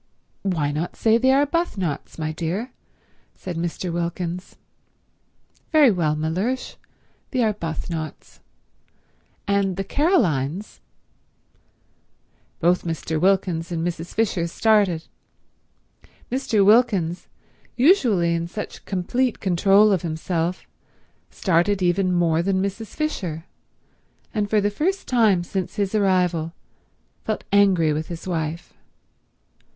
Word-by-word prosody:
"Why 160 -7 0
not 155 +4 -3
say 225 0 +3
the 260 - +2
Arbuthnots, 275 - 0
my 155 -1 -2
dear?" 175 +10 -3 0.6
said 180 -2 -6
Mr. 170 +1 -3
Wilkins. 175 +1 -4 1.2
"Very 300 -6 +6
well, 160 -5 0
Mellersh—the 190 - -5
Arbuthnots. 165 - -3 1.1
And 200 -2 +1
the 195 - -1
Carolines—" 195 - 0 1.8
Both 175 0 +2
Mr. 160 -1 -3
Wilkins 180 -3 +1
and 165 -1 -2
Mrs. 170 -1 -5
Fisher 195 -6 +1
started. 200 -3 +2 1.3
Mr. 230 -6 +2
Wilkins, 200 -6 +3 0.5
usually 240 - +4
in 170 0 -2
such 210 +4 -7
complete 230 +7 -1
control 195 +3 +4
of 190 -4 +2
himself, 165 +1 -2 0.6
started 185 +2 +1
even 180 +1 +2
more 170 -2 +2
than 190 +1 0
Mrs. 200 +3 -4
Fisher, 180 - -3 0.9
and 210 -3 -1
for 215 - +3
the 205 0 +1
first 365 - -1
time 215 -8 +3
since 185 +1 -4
his 200 -1 -1
arrival 180 -5 +1 0.7
felt 215 - -3
angry 185 -6 +4
with 155 +1 -3
his 170 +1 -7
wife. 165 0 -3
185 Hz, 105 wpm, -23 LUFS, 165-210 Hz, 1.8 s, Very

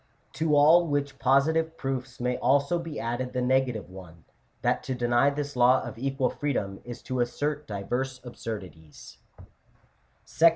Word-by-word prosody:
To 155 -2 +1
all 160 +4 +6
which 140 -2 -2
positive 160 +5 +2
proofs 130 -2 -4
may 125 0 0
also 140 +6 +2
be 165 -3 -6
added 125 +2 -3
the 125 - -1
negative 125 -4 +1
one, 90 -3 -13 0.4
that - - +1
to 130 - -2
deny 120 +2 +3
this 145 0 -4
law 125 +1 +5
of 120 -2 -8
equal 135 0 0
freedom 100 -10 -2
is 120 -1 -9
to 130 -1 -3
assert 145 +5 -1
divers 125 +6 -3
absurdities 95 - -9 1.1
(Chap. 165 +1 +5
130 Hz, 150 wpm, -27 LUFS, 120-145 Hz, 1.1 s, all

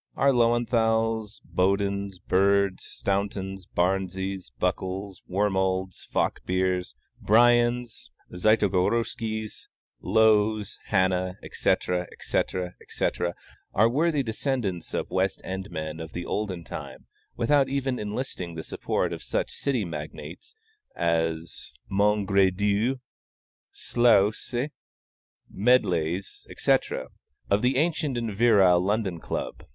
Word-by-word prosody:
Our 140 0 +4
Löwenthals, 115 -2 +1
Bodens, 100 +1 0
Birds, 100 +1 +2
Stauntons, 95 -1 -3
Barneses, 95 0 -1
Buckles, 95 0 -2
Wormalds, 95 -1 0
Falkbeers, 90 -1 0 0.3
Briens, 120 - +3 0.2
Zytogoroskys, 110 +2 0 0.3
Lowes, 110 0 +3
Hannahs, 95 -1 +1
etc., 90 -1 0
etc., 90 -1 -2
etc., 85 0 -2 0.4
are 110 +3 +5
worthy 150 +3 +1
descendants 110 - -2
of - - -3
West 95 +1 0
End 95 +1 -5
men 80 -1 -5
of 80 -1 -7
the 85 - -4
olden 95 -5 -3
time, - - -8 0.3
without 135 +3 +3
even 135 -2 -1
enlisting 105 -5 -4
the 80 - -5
support - - -2
of - - -6
such - - -2
city 130 -7 -1
magnates 75 - -8 0.4
as 80 -1 -1 0.2
the - - -10
Mongredieus, 100 +3 +2 0.7
Slouses, 120 +3 +2 0.8
Medleys, 95 -6 +1
etc., - - 0 0.4
of 100 +1 +4
the 125 +2 +2
ancient 155 -4 0
and 115 -3 -2
virile 100 -6 +5
London 100 -3 0
Club. - - -5
100 Hz, 100 wpm, -26 LUFS, 90-115 Hz, 0.8 s, are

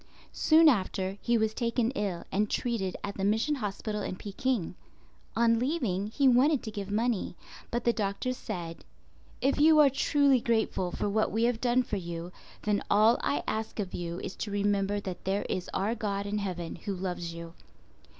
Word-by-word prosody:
Soon 320 +1 +5
after, 195 -5 +1
he 235 -1 +2
was 220 -1 +1
taken 235 0 0
ill 200 -9 -3
and 205 +2 +1
treated 220 -7 -1
at 200 - -5
the 195 - -2
mission 220 +9 +2
hospital 210 -3 -3
in - - -3
Peking. 210 0 -2 0.6
On 230 0 +3
leaving, 240 - -1
he 270 +6 +2
wanted 265 +3 +4
to 220 - -5
give 200 -2 -5
money; 220 -3 0 0.3
but 240 0 -2
the 235 - +3
doctor 210 +4 -1
said. 175 -9 -6 0.6
"If 275 +2 +2
you 310 +1 +6
are 290 -3 +7
truly 280 0 +3
grateful 220 -6 0
for - - -2
what 215 +2 +1
we 225 +1 0
have 235 -1 +1
done 250 0 +3
for 210 - -3
you, 170 -1 -6 0.3
then 210 -1 +1
all 215 +3 +5
I 285 - 0
ask 220 0 -3
of 195 -3 -3
you 170 0 -4
is - - -6
to 215 - -4
remember 205 0 +1
that 185 -3 -6
there 195 +2 0
is 185 - -3
our 205 +4 0
God 205 -3 -2
in 210 +1 -1
heaven 180 -4 -4
Who 195 +4 -4
loves 175 -2 -4
you." 170 0 -8
210 Hz, 185 wpm, -29 LUFS, 195-240 Hz, 0.6 s, are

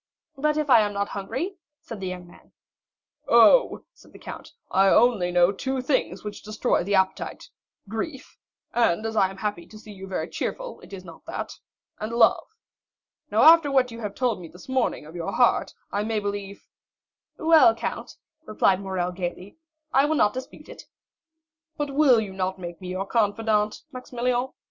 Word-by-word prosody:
"But 300 +2 0
if 305 -1 0
I 250 -4 +7
am 205 -1 -1
not 200 0 -2
hungry?" 285 - -4 0.2
said 230 - -9
the 190 - -4
young 180 -1 -6
man. 175 - -19 0.7
"Oh," - - +5
said - - -21
the - - -12
count, - - -10 0.2
"I 195 +1 +4
only 200 -4 +4
know 175 +1 +4
two 265 +6 -3
things 255 - -1
which 210 -1 -7
destroy 215 -1 0
the 200 +3 0
appetite,—grief—and 220 - -3
as 220 0 -3
I 195 -3 +3
am 195 - -11
happy 195 -4 -4
to 215 - -13
see 215 0 -12
you 195 -1 -10
very 190 - -3
cheerful, - - -5
it - - -16
is 190 -2 -9
not 165 -2 -13
that—and 215 +2 -8
love. 235 -1 +3 0.8
Now - - +3
after 325 -2 +7
what 260 -3 +2
you 230 -2 -5
told 230 -1 -1
me 170 - -9
this 180 +3 -15
morning 260 - -1
of 160 +3 -12
your 170 -1 -4
heart, 245 -2 +2 0.2
I 205 +1 -1
may 220 0 -1
believe——" 200 -1 -6 0.7
"Well, 325 +1 +5
count," - - -5 0.3
replied 195 -3 +2
Morrel 185 -2 -2
gayly, 180 - -6 0.4
"I 270 +2 +5
will 310 +1 +1
not 210 -7 +3
dispute 255 +1 -9
it." - - -12 0.9
"But 295 -1 -2
you - - -7
will 275 -5 +5
not 190 0 -2
make 175 -1 -8
me 185 - -7
your 185 +2 -3
confidant, 210 0 0
Maximilian?" 250 -1 -2
210 Hz, 170 wpm, -25 LUFS, 190-255 Hz, 0.9 s, I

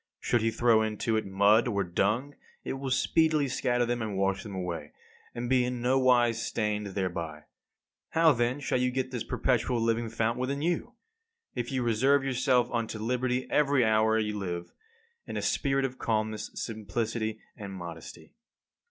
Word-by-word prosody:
Should 120 - +1
he 115 - +2
throw 115 -1 +3
into 110 +1 -1
it 110 -2 -1
mud 100 +5 +4
or 100 -4 0
dung, 105 +10 0 0.3
it - - -3
will 135 0 -4
speedily 155 +3 +2
scatter 120 -1 0
them 120 0 -1
and 105 -3 -3
wash 95 0 +1
them 100 -3 -8
away, 85 -5 -5 0.4
and 120 +1 -3
be 130 0 +3
in 125 0 -2
nowise 125 -2 +3
stained 105 -2 -1
thereby. 85 -5 -3 0.7
How 165 0 +5
then 120 +2 0
shall 130 - 0
you 125 0 +2
get 130 0 -2
this 125 -3 -3
perpetual 125 -1 0
living 115 0 0
fount 115 +2 -1
within 140 +3 -2
you? 175 +8 -1 0.6
If 120 0 -3
you 130 -2 0
reserve 130 +5 +3
yourself 130 -2 +2
unto 115 -2 -2
liberty 125 +3 -1
every 140 -4 +3
hour 110 0 +3
you 105 -1 -1
live, 85 -3 -5 0.5
in - - -4
a - - -1
spirit 135 -1 +1
of 130 -1 -5
calmness, 110 -1 -1
simplicity, 110 0 -3 0.2
and 100 -2 -8
modesty. 85 -4 -9
115 Hz, 165 wpm, -29 LUFS, 105-130 Hz, 0.7 s, How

